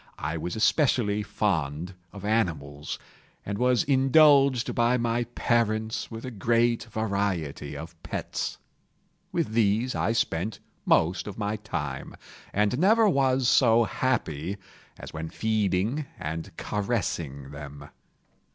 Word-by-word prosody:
I 80 +1 -3
was 85 +2 -4
especially 110 -3 +2
fond 85 -5 -1 0.2
of 100 -1 -9
animals, 80 -10 -1 0.5
and 100 0 -3
was 125 -1 +3
indulged 135 -1 +5
by 120 +1 +3
my 120 0 0
parents 110 -2 0
with 115 +1 -7
a 130 - -5
great 115 +2 +1
variety 100 - -2
of 80 +2 -10
pets. - - -4 0.7
With - - 0
these 115 +3 +2
I 115 - 0
spent 105 -3 -1 0.3
most 90 +6 +3
of 100 - -7
my 105 0 -1
time, 75 -9 -5 0.4
and 105 +5 +1
never 220 +5 +5
was 135 -6 +2
so 120 -3 +5
happy 100 - -1 0.4
as - - -10
when 80 0 -5
feeding 110 - 0
and 80 +4 -4
caressing 85 - -2
them. 70 0 -9
105 Hz, 120 wpm, -27 LUFS, 80-120 Hz, 0.7 s, indulged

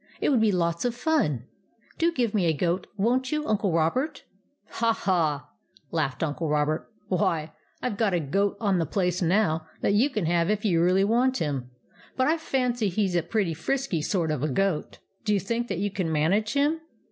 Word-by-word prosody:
It - - +1
would 255 -6 +3
be 220 -1 +4
lots 170 -2 0
of 245 -1 0
fun! 240 - 0 0.5
Do 335 +1 +3
give 245 -9 0
me 190 -5 +2
a 160 - +3
goat, 175 +4 0
won't 250 +5 +1
you, 300 0 -1
Uncle 205 -3 +1
Robert? 255 - 0
" 200 - -42
" - - -48
Ha, 230 0 +3
ha! 155 -9 0 0.2
" 145 - -31
laughed 155 -5 -1
Uncle 160 +1 -2
Robert. 150 +1 0
" - - -45
Why, 165 -4 0 0.3
I 250 - +1
Ve 205 - -6
got 205 -5 +2
a - - +2
goat 195 +8 0
on 200 -5 +1
the 165 - 0
place 180 0 0
now 165 -3 +1
that - - +2
you 235 +8 +4
can 215 - -2
have 170 +1 +2
if 210 0 0
you 170 -5 +3
really 185 +3 +4
want 245 +5 +2
him; 140 -5 -2 0.5
but 260 - +3
I 320 +2 +2
fancy 250 -7 0
he 200 +2 +1
's 185 - -4
a 175 - +2
pretty 185 0 -1
frisky 190 - -1
sort 165 0 0
of 150 -4 -2
a 155 - 0
goat. 185 +3 -1 0.3
Do 210 -2 +2
you - - +2
think 230 +5 -2
that - - -3
you 200 +2 -1
can 185 -4 -2
manage 195 +9 +1
him 295 +3 +1
195 Hz, 220 wpm, -26 LUFS, 165-230 Hz, 0.5 s, be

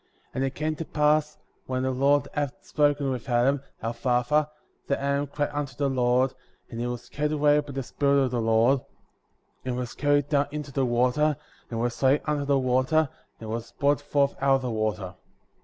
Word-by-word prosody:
And 130 - -1
it 135 0 -2
came 155 +1 -1
to - - -3
pass, 150 0 +1 0.3
when 130 0 -1
the 130 - +1
Lord 140 +3 +2
had 145 -3 -1
spoken 145 -2 +1
with 130 0 -5
Adam, 130 +3 +2 0.2
our 115 +1 -1
father, 130 +5 +1 0.4
that 140 - 0
Adam 140 +1 0
cried 145 +1 -2
unto 145 -3 -3
the 140 +1 0
Lord,* 125 0 +2 0.4
and 115 - -6
he 120 - -1
was 120 -1 -5
caught 150 +1 -2
away 150 -1 +4
by 145 -1 -5
the 135 0 -3
Spirit 140 +2 +2
of 130 - -1
the 120 -2 0
Lord,* 115 +4 +3 0.8
and 125 -1 -3
was 125 -1 -4
carried 145 -1 +2
down 145 -1 +2
into 150 -2 -6
the 135 -1 0
water, 125 +5 +2 0.3
and 115 - -3
was 120 0 -2
laid 135 +2 +4
under 150 -2 -1
the 140 -1 +3
water, 130 +4 +2 0.3
and 110 -1 -7
was 115 +1 -5
brought 145 0 +1
forth 145 -1 +1
out 135 0 +4
of 135 - -1
the 125 - -2
water. 110 -4 -2
135 Hz, 200 wpm, -26 LUFS, 125-145 Hz, 0.8 s, away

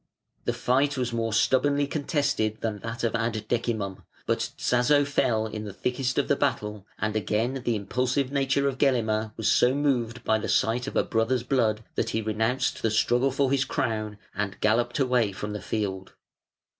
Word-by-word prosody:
The - - +1
fight 140 +3 +1
was 125 -2 -1
more 115 -1 -1
stubbornly 140 +6 +3
contested 140 -7 -1
than 110 -2 -2
that 115 +3 -5
of 115 - +1
Ad 115 -2 -1
Decimum; 110 -5 -2 0.2
but - - +1 0.2
Tzazo 140 +4 +3
fell 115 -5 +1
in 110 -1 -5
the 105 -2 -7
thickest 125 +4 -2
of 145 - +2
the 145 - +3
battle, 105 -8 -2
and 110 0 -2
again 115 +5 0
the 120 - +1
impulsive 125 +6 -1
nature 140 0 +1
of 135 -1 -2
Gelimer 110 -5 +1
was 110 - -1
so 125 +2 +4
moved 125 -5 0
by 110 - +2
the - - -4
sight 120 +3 +1
of - - -5
a - - +3
brother's 115 +2 0
blood 115 -4 +1
that - - -1
he 110 - -1
renounced 110 +4 0
the 115 - +2
struggle 120 +5 +2
for 135 0 +1
his 140 -1 +3
crown 110 -5 -2 0.2
and 100 -1 -3
galloped 120 +3 +1
away 125 -6 +2
from 105 +2 -5
the 105 - -5
field. 95 -4 -3
120 Hz, 180 wpm, -26 LUFS, 110-130 Hz, 0.2 s, so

